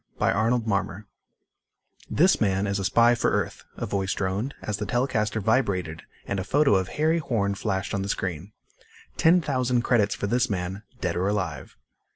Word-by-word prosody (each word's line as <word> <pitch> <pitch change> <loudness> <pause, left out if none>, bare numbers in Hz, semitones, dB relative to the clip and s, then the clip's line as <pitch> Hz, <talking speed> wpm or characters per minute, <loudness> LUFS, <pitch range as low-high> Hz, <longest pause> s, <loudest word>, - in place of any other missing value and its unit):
By - - +2
Arnold 115 +3 +1
Marmor 100 -1 -2 1.0
"This 185 0 +3
man 95 -2 +1
is 100 0 -1
a - - -2
spy 115 +5 +5
for 120 - +1
Earth," - - -2
a - - -3
voice 95 0 -1
droned, 100 +7 -2
as 105 -1 -2
the 105 -1 -4
telecaster 115 -4 0
vibrated 95 -7 0 0.2
and 100 - -2
a - - -2
photo 145 +4 +3
of 95 -2 +2
Harry 160 +2 +2
Horn 105 -9 -1
flashed 95 -1 -2
on 100 - -1
the 100 - -4
screen. 90 0 -3 0.6
"Ten 175 +2 +4
thousand 125 -5 0
credits 110 -5 +2
for - - -3
this 125 +5 +1
man, 95 0 -3 0.2
dead 85 -1 -1
or 90 +2 0
alive. 95 -9 -3
105 Hz, 180 wpm, -25 LUFS, 95-120 Hz, 1.0 s, spy